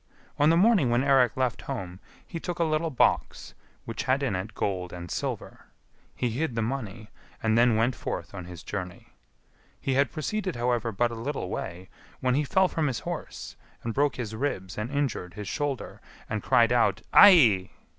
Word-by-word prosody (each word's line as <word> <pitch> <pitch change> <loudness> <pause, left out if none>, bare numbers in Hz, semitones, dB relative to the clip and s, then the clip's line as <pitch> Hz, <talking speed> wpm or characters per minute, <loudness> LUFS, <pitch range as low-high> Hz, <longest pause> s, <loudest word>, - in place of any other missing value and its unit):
On 145 +1 +5
the 165 - +4
morning 190 - +4
when 120 +2 +2
Eirik 135 -4 +3
left 130 -2 0
home 95 -9 -6 0.3
he 170 - -6
took 175 +1 -4
a 170 - +2
little 160 +1 0
box, 135 - 0 0.3
which 115 - -5
had 135 +2 +1
in 120 -8 0
it 100 +4 -5
gold 90 -3 -2
and 85 -1 -8
silver; - - -5 0.5
he 125 -2 -1
hid 130 +1 -2
the 115 - 0
money, 110 -3 -5 0.3
and 110 -1 +2
then 120 0 +4
went 115 +4 +2
forth 85 -6 -5
on 90 -3 -7
his 90 -1 -10
journey. 90 -2 -6 0.7
He 135 - -1
had 135 -2 +2
proceeded, 185 +4 -3
however, 120 -1 0
but 120 +3 0
a - - -5
little 115 -3 -4
way, 90 +1 -5 0.3
when 125 -1 +1
he 145 +4 +2
fell 190 +6 +3
from 160 -4 -1
his 130 -4 -2
horse, - - -6 0.3
and 115 - -3
broke 145 +2 +1
his 115 -4 -5
ribs 95 -7 -3
and 105 +3 -3
injured 135 -11 -2
his 105 -2 -6
shoulder, 145 +1 -3 0.3
and 110 -1 -3
cried 115 +3 +4
out, 120 -2 +2
"Aiai!" 125 - +7
120 Hz, 185 wpm, -27 LUFS, 105-145 Hz, 0.7 s, Aiai